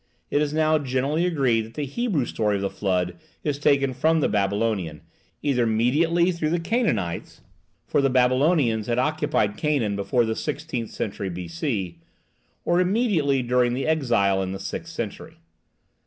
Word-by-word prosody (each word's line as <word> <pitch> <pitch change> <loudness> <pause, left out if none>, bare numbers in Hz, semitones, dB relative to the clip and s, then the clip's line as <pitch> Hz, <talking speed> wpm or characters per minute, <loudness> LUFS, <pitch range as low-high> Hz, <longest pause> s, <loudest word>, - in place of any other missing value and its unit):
It 145 - +2
is 150 -1 0
now 155 0 +2
generally 140 +5 0
agreed 135 -9 +2
that 110 +1 -10
the 150 - -2
Hebrew 160 - -1
story 105 -2 0
of 100 - -2
the 100 - -1
Flood 90 -3 -1 0.2
is 145 -2 -1
taken 140 -2 +2
from 160 +6 +2
the - - +2
Babylonian, 100 -5 -1 0.4
either 125 -5 +2
mediately 160 +11 +2
through 170 -3 -2
the 170 +2 +1
Canaanites 165 - -1 0.4
(for - - +1
the 135 - +3
Babylonians 130 -2 +2
had 120 0 0
occupied 145 -6 0
Canaan 135 -9 0
before 100 +5 +1
the 110 0 -1
sixteenth 145 -6 -4
century 100 -1 -4
B.C.), 90 - -4 0.7
or 175 +1 +3
immediately 180 - +1
during 120 0 +2
the 135 - -2
exile 115 -11 +2
in 95 0 -3
the 95 - -6
sixth 165 +11 -6
century. 155 +3 -6
130 Hz, 155 wpm, -24 LUFS, 105-155 Hz, 0.7 s, the